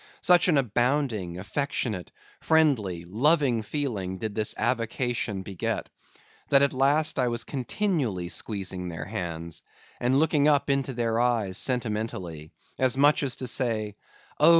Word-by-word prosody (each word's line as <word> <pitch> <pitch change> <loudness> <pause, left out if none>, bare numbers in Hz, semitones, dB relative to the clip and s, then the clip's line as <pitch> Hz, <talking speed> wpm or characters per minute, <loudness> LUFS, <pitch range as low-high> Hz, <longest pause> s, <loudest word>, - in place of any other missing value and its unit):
Such 180 0 +5
an 160 -5 +4
abounding, 120 -6 0
affectionate, 110 -2 -3 0.3
friendly, 120 - +2
loving 125 - +2
feeling 105 -7 -3
did 110 +1 -4
this 110 0 -1
avocation 115 -3 -1
beget; 95 -2 -3 0.6
that 140 0 +5
at 140 - +2
last 145 +4 +2
I 125 - +3
was 120 0 -2
continually 130 - -1
squeezing 95 -3 -3
their 85 -2 -5
hands, 85 -5 -4 0.4
and 125 +2 +2
looking 150 -1 +3
up 145 -2 +3
into 135 -1 0
their 115 -1 0
eyes 115 -6 +1
sentimentally; 105 - -3 0.3
as 130 0 +2
much 145 +2 +5
as 135 -3 -1
to 130 - -5
say,—Oh! 115 +5 -1
120 Hz, 130 wpm, -27 LUFS, 100-140 Hz, 0.6 s, Such